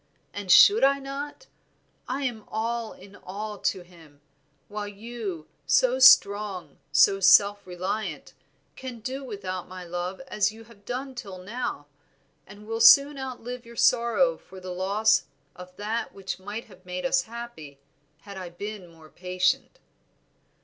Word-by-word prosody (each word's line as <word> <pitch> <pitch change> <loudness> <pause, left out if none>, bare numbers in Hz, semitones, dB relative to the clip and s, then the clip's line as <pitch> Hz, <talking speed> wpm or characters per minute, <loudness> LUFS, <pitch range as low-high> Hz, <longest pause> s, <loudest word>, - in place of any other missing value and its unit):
and 200 -3 -3
should 415 - +8
I 275 +1 +5
not? 280 - -7 0.6
I 270 +3 -3
am 235 -5 -3
all 230 +1 -3
in 195 +1 -15
all 210 +2 -7
to 190 - -1
him, 165 -5 -19 0.5
while 210 0 -5
you, 205 -5 -7 0.2
so 255 - +3
strong, 200 - +5
so 145 +8 +5
self 200 +1 +5
reliant, 185 +4 -4 0.4
can 250 -3 -8
do 265 +4 -5
without 195 -6 -6
my 185 0 -9
love 175 +2 -4
as 210 -1 +1
you 225 +1 -13
have 215 -3 -20
done 260 +3 -5
till 205 -7 -8
now, 205 -4 -5 0.6
and 205 +1 -13
will 225 +1 -3
soon 280 +4 +7
outlive 250 -2 -6
your 235 0 -13
sorrow 250 - +3
for 190 0 -13
the 185 0 -7
loss 200 +4 +2 0.3
of 180 0 -12
that 215 +4 -3
which 190 -2 -6
might 205 +4 -6
have 185 -3 -18
made 180 0 -5
us 265 0 +3
happy 230 -12 -9 0.4
had 200 -1 -10
I 185 -2 -6
been 200 +2 -7
more 160 -1 -17
patient." 185 - -1
205 Hz, 150 wpm, -26 LUFS, 185-235 Hz, 0.6 s, should